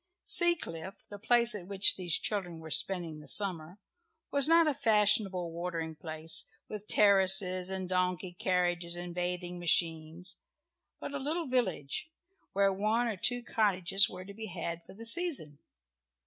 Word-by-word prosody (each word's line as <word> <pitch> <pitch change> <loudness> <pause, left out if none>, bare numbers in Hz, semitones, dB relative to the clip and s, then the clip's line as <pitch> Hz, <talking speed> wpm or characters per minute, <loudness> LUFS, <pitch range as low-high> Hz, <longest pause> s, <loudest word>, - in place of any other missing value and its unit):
Seacliff, 195 - +3
the 205 - -10
place 235 +1 +4
at 185 -4 -8
which 195 0 +4
these 175 -3 +1
children 185 -5 -3
were 160 -1 -11
spending 170 -2 -1
the 150 - -15
summer, 180 -3 -1 0.5
was 280 0 +3
not 330 +1 +4
a 305 - 0
fashionable 210 -6 +2
watering 165 -1 -5
place, 160 0 -4 0.2
with 210 0 -9
terraces 190 -2 +3
and 190 -1 -5
donkey 180 -1 -2
carriages 175 -1 -1
and 175 0 -7
bathing 180 0 -4
machines, 165 0 0 0.6
but 285 - -8
a 285 - -4
little 315 +5 -4
village, 240 - -3 0.4
where 195 0 +1
one 215 +5 -1
or 225 -3 -3
two 245 +6 +1
cottages 195 -4 +3
were 185 0 -10
to 200 - -11
be 220 +2 -8
had 170 -2 -6
for - - -16
the 230 +3 -9
season. 230 - +3
185 Hz, 150 wpm, -29 LUFS, 175-215 Hz, 0.6 s, place